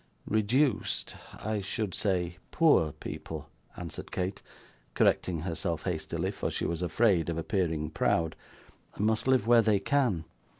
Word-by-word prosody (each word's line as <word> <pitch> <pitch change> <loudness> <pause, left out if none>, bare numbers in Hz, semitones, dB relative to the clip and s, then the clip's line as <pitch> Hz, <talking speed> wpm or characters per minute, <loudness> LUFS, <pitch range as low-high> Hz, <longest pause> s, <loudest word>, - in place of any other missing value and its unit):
'Reduced 115 +5 +1 0.2
I 110 -1 -3
should 100 0 -3
say 90 -3 0
poor 150 - +4
people,' 75 - -7 0.3
answered 85 -3 -7
Kate, 95 +1 -2 0.5
correcting 85 -4 +2
herself 85 -1 -2
hastily, 85 +1 -2
for - - -3
she - - -2
was 85 0 -2
afraid 90 -1 +2
of 85 - -2
appearing 80 -3 -1
proud, 80 -1 +1 0.6
'must 110 +3 +1
live 130 -5 +4
where 120 0 +6
they 110 -2 +3
can. 120 - +1
95 Hz, 130 wpm, -30 LUFS, 85-110 Hz, 0.6 s, where